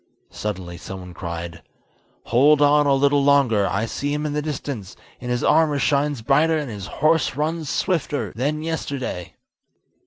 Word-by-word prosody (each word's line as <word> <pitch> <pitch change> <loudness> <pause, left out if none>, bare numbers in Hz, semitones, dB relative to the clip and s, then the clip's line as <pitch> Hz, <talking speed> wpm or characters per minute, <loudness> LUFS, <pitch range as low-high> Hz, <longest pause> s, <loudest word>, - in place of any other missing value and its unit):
Suddenly 90 -4 -5
someone 90 -1 -9
cried: 85 -1 -6 0.6
"Hold 145 +6 +4
on 145 0 +4
a 140 - +4
little 140 +1 +3
longer, 130 -8 +3
I 105 +4 -1
see 145 +5 -3
him 150 +1 -2
in 150 - -2
the 150 - -1
distance; 140 -9 -5 0.2
and 125 - -6
his 120 0 -1
armour 155 -3 +3
shines 140 -1 0
brighter, 155 +6 +3
and 145 -5 -4
his 100 -2 -7
horse 155 +1 +1
runs 155 +1 -2
swifter, 145 - -1
than 150 +6 -1
yesterday." 140 - -4
140 Hz, 155 wpm, -22 LUFS, 105-150 Hz, 0.6 s, Hold